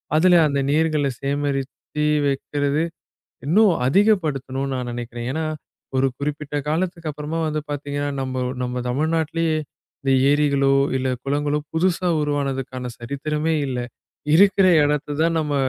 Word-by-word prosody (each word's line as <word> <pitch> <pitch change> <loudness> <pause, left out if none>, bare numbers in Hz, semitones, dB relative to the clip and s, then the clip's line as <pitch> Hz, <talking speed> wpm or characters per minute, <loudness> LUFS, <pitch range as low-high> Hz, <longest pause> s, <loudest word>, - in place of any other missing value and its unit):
அதுல 175 +2 +6
அந்த 140 -1 0
நீர்களை 155 -2 +2
சேகரிச்சு 140 +1 -2 0.2
வைக்கிறது, 145 +2 0 0.6
இன்னும் 200 +6 +5
அதிகப்படுத்தணும்ன்னு 140 -8 +1
நான் 125 -1 -3
நெனைக்கிறேன். 120 0 -5
ஏன்னா 160 +3 -2 0.5
ஒரு 130 +1 +3
குறிப்பிட்ட 150 0 -3
காலத்துக்கு 170 0 -1
அப்புறமா 150 +2 -4
வந்து 155 0 -1
பாத்தீங்கன்னா, 145 0 -3
நம்ப 130 0 -4 0.3
நம்ம 125 0 -3
தமிழ்நாட்டிலேயே 160 +4 0 0.5
இந்த 135 -1 +2 0.2
ஏரிகளோ, 140 -2 +3 0.2
இல்ல 130 - -1 0.2
குளங்களோ 145 +1 0
புதுசா 180 +1 +1
உருவானதுக்கான 135 -3 -2
சரித்திரமே 150 +5 -2
இல்ல. 130 -2 -3 0.6
இருக்கிற 195 0 +5 0.2
இடத்தை 145 0 -1
தான் 165 0 +2
நம்ம 150 -2 -2
145 Hz, 120 wpm, -22 LUFS, 135-160 Hz, 0.6 s, அதுல